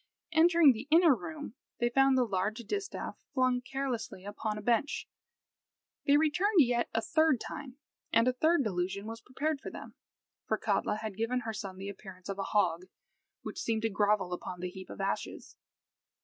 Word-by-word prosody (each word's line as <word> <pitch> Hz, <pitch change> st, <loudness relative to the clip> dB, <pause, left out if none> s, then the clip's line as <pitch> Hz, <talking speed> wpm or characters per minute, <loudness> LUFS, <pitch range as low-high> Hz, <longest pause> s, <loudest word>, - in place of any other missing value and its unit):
Entering 325 Hz, -2 st, +6 dB
the 235 Hz, +4 st, -7 dB
inner 330 Hz, -1 st, +7 dB
room, 295 Hz, -1 st, -6 dB, 0.3 s
they 240 Hz, 0 st, +1 dB
found 270 Hz, +1 st, +4 dB
the 255 Hz, -, +4 dB
large 200 Hz, +1 st, -1 dB
distaff 400 Hz, -, -5 dB
flung 255 Hz, -1 st, +2 dB
carelessly 250 Hz, -7 st, -4 dB
upon 210 Hz, +1 st, -3 dB
a -, -, -5 dB
bench. 240 Hz, +5 st, +1 dB, 1.0 s
They 285 Hz, +1 st, +6 dB
returned 360 Hz, +6 st, +3 dB
yet 240 Hz, -2 st, +2 dB
a 225 Hz, -, 0 dB
third 315 Hz, -5 st, +3 dB
time, 275 Hz, -1 st, -7 dB, 0.3 s
and 230 Hz, +2 st, +4 dB
a 255 Hz, -, +3 dB
third 315 Hz, +4 st, +3 dB
delusion 195 Hz, -1 st, -2 dB
was 225 Hz, +1 st, -7 dB
prepared 285 Hz, +4 st, -2 dB
for -, -, -6 dB
them; -, -, -9 dB, 0.5 s
for -, -, +1 dB
Katla -, -, 0 dB
had 215 Hz, -2 st, -5 dB
given 235 Hz, +3 st, 0 dB
her 225 Hz, -1 st, -4 dB
son 195 Hz, -3 st, -6 dB
the 195 Hz, +1 st, -6 dB
appearance 190 Hz, -1 st, -10 dB
of 195 Hz, 0 st, -4 dB
a -, -, 0 dB
hog, 180 Hz, -4 st, +1 dB, 0.6 s
which -, -, -5 dB
seemed 225 Hz, -1 st, -1 dB
to 225 Hz, -, +2 dB
grovel 205 Hz, -2 st, +2 dB
upon 180 Hz, 0 st, -6 dB
the 180 Hz, 0 st, -4 dB
heap 190 Hz, 0 st, -10 dB
of -, -, -9 dB
ashes. 195 Hz, 0 st, -3 dB
230 Hz, 175 wpm, -31 LUFS, 200-275 Hz, 1.0 s, inner